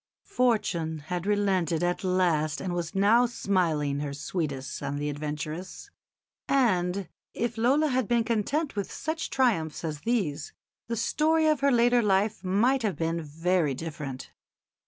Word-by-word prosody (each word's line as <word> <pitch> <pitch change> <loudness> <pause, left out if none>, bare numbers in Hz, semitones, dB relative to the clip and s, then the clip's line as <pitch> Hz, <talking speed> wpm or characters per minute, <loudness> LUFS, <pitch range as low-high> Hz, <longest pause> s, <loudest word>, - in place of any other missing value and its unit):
Fortune 210 - 0 0.2
had 180 +2 -3
relented 190 -5 +1
at 175 +2 -1
last 175 -5 +1
and 185 -2 -3
was 175 +1 -3
now 220 +5 +5
smiling 165 -11 0
her 145 -1 -4
sweetest 140 -4 -4
on 145 - -3
the 145 +1 -2
adventuress; 155 +4 -6 0.6
and 190 -8 +1 0.3
if 235 -1 -2
Lola 270 +7 +3
had 255 -4 0
been 235 -1 +2
content 235 +7 -1
with 200 -2 -3
such 320 +1 -3
triumphs 200 - 0
as 155 -3 -3
these 175 -9 -1 0.3
the 230 0 -2
story 315 +7 +2
of 305 -3 +3
her 280 0 +3
later 240 0 +4
life 205 +1 +1
might 230 +9 +2
have 210 -5 -1
been 165 0 -1
very 160 -1 0
different. 145 -4 -6
185 Hz, 145 wpm, -27 LUFS, 160-235 Hz, 0.6 s, now